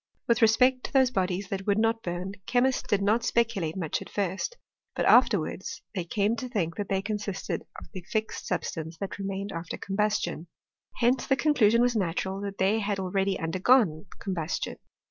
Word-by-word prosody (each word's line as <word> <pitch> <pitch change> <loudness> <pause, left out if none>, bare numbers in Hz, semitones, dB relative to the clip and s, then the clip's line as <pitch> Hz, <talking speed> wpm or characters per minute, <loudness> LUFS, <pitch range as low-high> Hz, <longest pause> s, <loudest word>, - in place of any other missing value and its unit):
With 235 +1 +3
respect 250 +3 +4
to - - -6
those 260 -2 +4
bodies 190 -3 -1
that 195 0 -4
would 200 0 +3
not 225 +1 +2
burn, 180 +1 -4
chemists 250 +1 +2
did 200 -1 0
not 220 +4 +2
speculate 230 -9 0
much 165 -5 -2
at - - -9
first; 200 - -2 0.4
but - - 0
after 240 -4 +6
wards 195 +10 -5
they 185 -5 -3
came 205 +5 +1
to 255 +2 -5
think 170 -9 -1
that 205 - -3
they 195 0 0
consisted 205 -2 -3 0.2
of - - -11
the 185 - -6
fixed 220 0 -2
substance 160 0 -3
that 195 +3 -5
remained 195 0 -3
after 165 0 -5
combustion. 200 -4 -1 0.5
Hence 245 +1 +2
the 270 - +4
conclusion 240 -6 +4
was 245 -1 +2
natural, 190 0 -1
that 200 0 -5
they 200 +4 +2
had 205 -2 -1
already 190 +1 0
undergone 180 0 +2
combustion. 180 -4 -3
200 Hz, 180 wpm, -28 LUFS, 185-230 Hz, 0.5 s, after